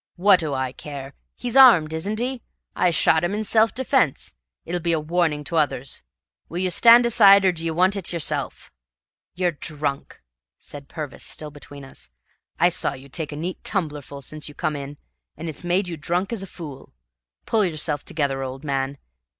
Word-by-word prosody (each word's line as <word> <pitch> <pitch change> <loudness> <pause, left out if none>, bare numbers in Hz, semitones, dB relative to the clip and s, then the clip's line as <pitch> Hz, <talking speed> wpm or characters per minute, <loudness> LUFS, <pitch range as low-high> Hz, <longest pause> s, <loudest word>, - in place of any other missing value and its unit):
"Wha' 195 +2 +6
do 160 -4 -1
I 130 -1 -2
care? 140 0 -8 0.2
He's 245 0 -4
armed, 220 -13 +7
isn't 200 +7 -2
he? 250 +1 -2 0.3
I 180 - +3
shot 160 -1 +3
him 180 +4 0
in 215 - -2
self 220 +1 +3
defence. 260 - 0 0.3
It'll 175 +1 -2
be 170 0 +1
a 160 - +1
warning 155 -1 0
to 165 +3 -2
others. 140 -4 -1 0.5
Will 170 - -6
you 185 0 0
stand 235 +5 +7
aside, 200 -4 +7
or 190 - +5
d'ye 165 -1 -3
want 185 +5 +2
it 195 -3 -3
yourself?" 170 -3 -3 0.6
"You're 180 -1 +1
drunk," 145 -2 -4 0.4
said 140 -1 -9
Purvis, 150 -4 -7
still 150 -1 -3
between 145 -1 -11
us. 135 - -8 0.5
"I 175 - +5
saw 175 - -1
you 135 +1 -12
take 155 +2 -5
a - - -6
neat 175 +5 -5
tumblerful 150 -7 -4
since 155 +3 -7
you 145 - -13
come 155 -1 -2
in, 140 0 -7 0.4
and 165 - -6
it's 160 +2 -6
made 180 +2 +1
you 170 -2 -5
drunk 175 +7 -1
as 220 - -4
a 195 - -7
fool. 145 - -10 0.5
Pull 220 -3 +2
yourself 155 -3 -2
together, 140 -3 -2
old 130 +1 -6
man. 140 -1 -2
160 Hz, 185 wpm, -23 LUFS, 145-185 Hz, 0.6 s, armed